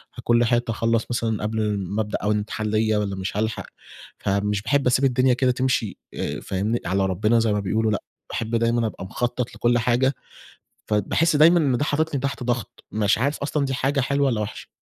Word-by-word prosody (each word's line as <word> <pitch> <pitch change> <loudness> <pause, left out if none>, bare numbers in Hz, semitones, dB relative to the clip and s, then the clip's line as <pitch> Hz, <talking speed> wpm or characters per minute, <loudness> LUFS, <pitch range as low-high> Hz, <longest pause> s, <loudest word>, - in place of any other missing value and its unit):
هاكون 120 0 +2
لحقت 120 0 +1
أخلَّص 115 0 +1
مثلًا 110 -3 -1
قبل 105 -1 -1
ما 100 +3 -2
ابدأ 105 -1 -2
أول 105 +1 +2
امتحان 105 +1 -3
ليّا 110 0 +1
والّا 100 -2 -1
مش 95 +2 -4
هالحق، 110 +1 -2 0.5
فمش 100 +1 0
باحب 130 +4 +1
أسيب 130 +2 +3
الدنيا 130 0 +3
كده 125 +1 +2
تمشي 125 -5 -1 0.5
فاهمني 105 +5 -1
على 95 +2 +1
ربنا، 105 +5 +2
زي 110 -2 +2
ما 105 - 0
بيقولوا، 110 +3 0
لأ 105 - -2 0.3
باحب 115 +1 -2
دايمًا 115 0 +2
أبقى 95 - -7
مخطط 120 +4 -3
لكل 120 0 +2
حاجة، 125 +3 +2 0.7
فباحس 110 - +1
دايمًا 165 +4 +6
إن 135 -6 +2
ده 145 - 0
حاططني 155 -1 0
تحت 135 -2 -3
ضغط، 120 -4 -3
مش 105 -1 +2
عارف 140 +5 0
أصلًا 140 0 -1
دي 135 - -2
حاجة 135 +2 0
حلوة، 140 +2 +1
والّا 115 -4 0
وحشة؟ 105 - -6
115 Hz, 190 wpm, -23 LUFS, 105-130 Hz, 0.7 s, دايمًا